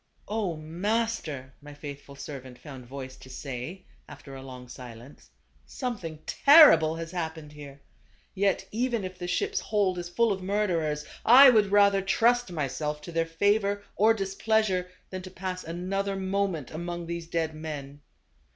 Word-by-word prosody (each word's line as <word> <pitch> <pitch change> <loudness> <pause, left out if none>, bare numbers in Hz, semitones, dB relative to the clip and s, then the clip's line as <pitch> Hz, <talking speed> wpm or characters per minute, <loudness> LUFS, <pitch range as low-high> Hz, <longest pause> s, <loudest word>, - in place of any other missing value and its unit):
" - - -36
0, 205 -5 -1
master! 165 - -2
" - - -36
my 145 0 -11
faithful 140 -1 -9
servant 130 -3 -8
found 130 -4 -11
voice 130 0 -8
to 130 - -14
say 135 +8 -7 0.2
after 140 -1 -11
a 135 - -8
long 130 -1 -10
silence, 125 +1 -12 0.4
"something 205 - -5
terrible 280 - +7
has 165 0 -6
happened 160 -4 -5
here. 145 -2 -11 0.5
Yet 195 0 0
even 235 -1 -1
if 185 -1 -7
the 175 - -4
ship's 405 - 0
hold 195 -4 0
is 175 0 -6
full 230 +5 +2
of 190 -1 -2
murderers, 175 -7 -1 0.2
I 260 +3 +9
would 210 -4 +3
rather 200 -1 +5
trust 240 +2 +2
myself 150 -1 -3
to 170 - -8
their 165 0 0
favor 200 +4 +1
or 220 +2 +4
displeasure, 195 -2 0 0.2
than 185 -1 -5
to 185 - -9
pass 185 0 -5
another 195 +4 -2
moment 190 -6 -2
among 175 +1 -5
these 170 0 -5
dead 165 -1 -1
men." 145 -2 -7
175 Hz, 160 wpm, -27 LUFS, 150-200 Hz, 0.5 s, I